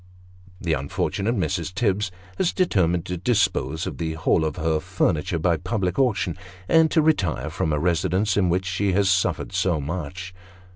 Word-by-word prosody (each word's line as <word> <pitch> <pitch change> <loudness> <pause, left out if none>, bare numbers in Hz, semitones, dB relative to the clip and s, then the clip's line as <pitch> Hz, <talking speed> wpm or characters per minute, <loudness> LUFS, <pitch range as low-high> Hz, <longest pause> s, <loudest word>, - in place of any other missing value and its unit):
The 85 -3 -1
unfortunate 95 - -1
Mrs. 90 -2 -1
Tibbs 100 +1 0 0.3
has 175 - +1
determined 90 - +1
to 90 0 -3
dispose 85 - 0
of - - -6
the 80 -1 -2
whole 80 0 +1
of 80 - -2
her 80 -2 0
furniture 80 +3 0
by 85 +1 +1
public 90 - -2
auction, 105 -10 +1 0.3
and 160 -1 +5
to 160 - +3
retire 100 - +1
from 80 - -1
a 75 - +1
residence 90 +5 +1
in 95 -3 +2
which 90 +2 0
she 95 +2 0
has 95 0 +3
suffered 90 0 0
so 90 -3 +1
much. 90 +4 -5
90 Hz, 165 wpm, -24 LUFS, 80-100 Hz, 0.3 s, and